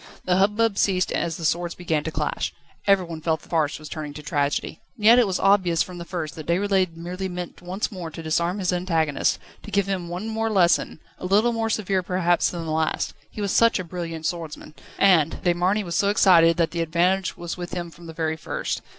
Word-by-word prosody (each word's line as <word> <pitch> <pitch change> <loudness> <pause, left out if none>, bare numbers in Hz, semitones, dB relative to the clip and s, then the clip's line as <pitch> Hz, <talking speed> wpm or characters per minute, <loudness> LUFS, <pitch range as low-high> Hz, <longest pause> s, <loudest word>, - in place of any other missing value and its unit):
The 180 0 +2
hubbub 210 +2 +2
ceased 185 -2 +2
as 165 -2 -1
the 165 - -5
swords 170 +2 0
began 160 -4 -1
to 160 - -2
clash. - - -2 0.3
Everyone 180 -5 +2
felt 160 -1 0
that - - -19
farce 155 -3 +1
was 155 - -10
turning 150 -2 -6
to 150 - -8
tragedy. 145 +1 -1 0.2
And 210 -4 -6
yet 235 +3 +8
it 240 - +4
was 185 - -1
obvious 190 -4 +3
from 180 -1 -9
the 170 - -6
first 170 -5 -4
that 155 - -9
Déroulède 185 0 +1
merely 180 +3 -4
meant 180 -1 -6
once 185 +5 -3
more 180 -5 -6
to 160 +1 -9
disarm 170 +4 0
his 185 -2 0
antagonist, 165 -5 +1 0.2
to - - -10
give 200 0 +1
him 185 -3 -3
one 180 +5 -4
more 225 0 -1
lesson, 180 -6 +2 0.2
a 180 - -4
little 215 +5 +3
more 225 -1 -1
severe 195 -3 0
perhaps 175 -1 +1
than 170 -2 -5
the 160 - -3
last. 155 0 0 0.2
He 210 - -7
was 200 -2 -1
such 230 0 +4
a 185 - -3
brilliant 165 -2 -6
swordsman, 160 -3 -4 0.2
and 165 -6 +4
De 175 -1 +3
Marny 185 +5 +1
was 170 -3 -5
so 200 - +3
excited, 170 -5 +5
that 170 -2 +1
the 170 - -2
advantage 175 +3 +1
was 175 0 -5
with 180 0 -6
him 175 -1 -4
from 170 0 -13
the 160 - -8
very 160 -1 -1
first. - - -3
175 Hz, 225 wpm, -24 LUFS, 165-195 Hz, 0.3 s, yet